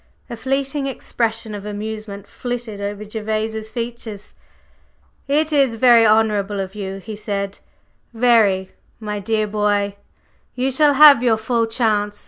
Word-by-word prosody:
A - - -4
fleeting 270 +3 -2
expression 225 -4 -2
of 205 -1 -7
amusement 210 -1 -6
flitted 240 -3 -6
over 205 +1 -5
Gervase's 220 0 -4
features. 230 -3 -6 0.9
"It 305 +2 +1
is 270 -5 +3
very 235 -1 +6
honorable 210 -2 +2
of 190 0 -4
you," 195 -2 -5
he 215 +2 -8
said, 200 -1 -4 0.5
"very! 225 -6 +2 0.3
My 210 -2 -4
dear 215 +1 0
boy, 205 -1 0 0.6
you 255 +2 0
shall 290 +2 +4
have 290 -3 +8
your 235 -3 +2
full 230 +1 0
chance. 210 -3 0
220 Hz, 130 wpm, -20 LUFS, 205-240 Hz, 0.9 s, have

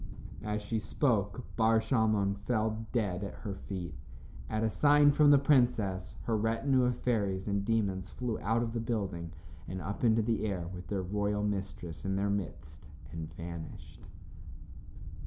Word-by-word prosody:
As 105 0 -2
she 110 +2 -1
spoke 105 0 0
Bar 115 0 +4
Shalmon 110 -5 +2
fell 110 -1 0
dead 100 -5 0
at 100 - -5
her 100 - -2
feet. 95 -4 -6 0.6
At 110 - 0
a 110 - +2
sign 145 +2 +6
from 145 +1 +5
the 145 - +8
princess, 120 -9 +2
her 115 - 0
retinue 115 +4 +2
of 125 -1 0
fairies 100 -6 0
and 100 -1 0
demons 100 -4 0
flew 120 -3 -3
out 115 +3 +1
of 115 -1 -3
the 120 - -1
building 100 -7 -3 0.4
and 95 - -4
up 100 +5 -5
into 115 -1 +4
the 115 0 0
air 90 -4 -3
with 90 0 -8
their 95 -2 -2
royal 105 +2 -1
mistress 95 -5 -3
in 95 0 -1
their 100 +1 +1
midst 85 -6 -5 0.2
and 80 -1 -6
vanished. 85 -2 -8
105 Hz, 160 wpm, -31 LUFS, 95-115 Hz, 0.6 s, the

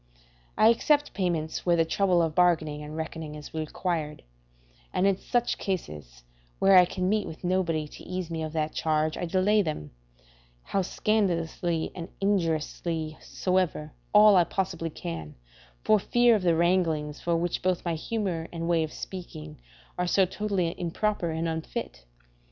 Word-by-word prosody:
I 215 - +6
except 290 +5 +2
payments 170 -5 -1
where 175 -1 +3
the 165 -1 +3
trouble 180 +1 +2
of 160 -1 -1
bargaining 155 -4 +2
and 150 +1 -7
reckoning 160 -1 -5
is 150 -1 -10
required; 155 -1 -3 0.7
and 185 - +1
in 195 -1 +4
such 240 +5 -1
cases; 75 - -5 0.3
where 195 0 +5
I 180 -1 +9
can 180 +1 -2
meet 210 +1 +1
with 160 - -9
nobody 175 -4 0
to - - -13
ease 180 -2 -5
me 165 -1 -3
of 155 -1 -3
that 155 -1 -1
charge, 155 0 0
I - - -3
delay 195 +4 +3
them, 155 - -4 0.7
how 195 - 0
scandalously 175 -5 0
and 170 -2 -7
injuriously 165 -4 -1
soever, 180 -5 -1 0.2
all 210 -1 +7
I 180 - +6
possibly 170 -2 -2
can, 80 - -7 0.5
for 215 -1 +4
fear 240 +4 +4
of 210 - 0
the 170 -2 +3
wranglings 165 -4 +1
for 170 -1 +1
which 175 +1 -1
both 185 -1 0
my 170 - 0
humour 175 -1 -2
and 165 -1 -4
way 170 -1 +3
of 155 - -4
speaking 75 - -8 0.4
are 180 - +1
so 190 +2 +4
totally 190 -3 -1
improper 180 +1 -1
and 160 +1 -2
unfit. 160 - -5
170 Hz, 160 wpm, -27 LUFS, 160-190 Hz, 0.7 s, I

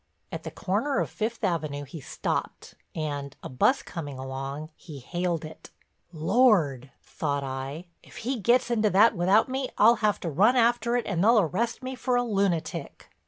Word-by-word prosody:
At - - -5
the - - -6
corner 220 +9 -1
of - - -2
Fifth 225 +1 -3
Avenue 155 -6 -1
he 145 +3 -9
stopped - - -4 0.2
and, 145 -3 -4
a - - -6
bus 130 - +2
coming 145 -6 -7
along, 135 +4 -6
he 150 -4 -11
haled 175 +4 -2
it. 155 - -11 0.4
"Lord," 160 - +2
thought 145 -2 -3
I, 135 +5 -5 0.2
"if - - -15
he 255 0 -1
gets 240 +4 +2
into 215 -2 +2
that 205 +4 +5
without 190 +5 +3
me 265 0 -3
I'll 230 +3 +6
have 210 -2 +1
to 165 - -3
run 210 - +4
after 235 0 +2
it 245 - 0
and 185 -3 -1
they'll 230 +3 +5
arrest 215 - -1
me 260 +1 -4
for 250 0 -1
a 245 - +2
lunatic." 195 -7 -2
185 Hz, 175 wpm, -27 LUFS, 150-235 Hz, 0.4 s, I'll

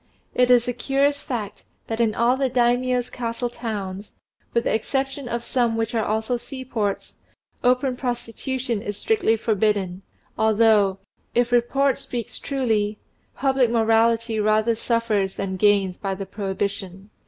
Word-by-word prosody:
It 250 0 +3
is 245 -1 +5
a 245 - 0
curious 275 +3 +1
fact 225 -7 -5 0.2
that 225 0 -4
in 225 -2 +2
all 240 +2 +3
the 265 0 0
Daimio's 245 0 +1
castle 235 0 -3
towns, 205 -4 -5 0.4
with 235 - +1
the - - 0
exception 270 +3 -2
of 235 0 -2
some 235 -3 0
which 225 +1 -1
are 225 -2 +1
also 220 +4 0
seaports, 240 -5 -4 0.5
open 250 +1 +2
prostitution 245 -1 -3
is 205 -1 -5
strictly 415 - +2
forbidden, 205 -4 0 0.4
although, 215 -3 +4 0.4
if 240 0 +2
report 265 +3 +2
speaks 240 -3 -4
truly, 220 -6 0 0.4
public 265 -2 +2
morality 225 0 +2
rather 215 +2 +2
suffers 220 -4 0
than 195 -1 -3
gains 195 -2 +3
by 195 -1 -3
the 195 +1 -5
prohibition. 195 0 -4
230 Hz, 140 wpm, -23 LUFS, 210-250 Hz, 0.5 s, is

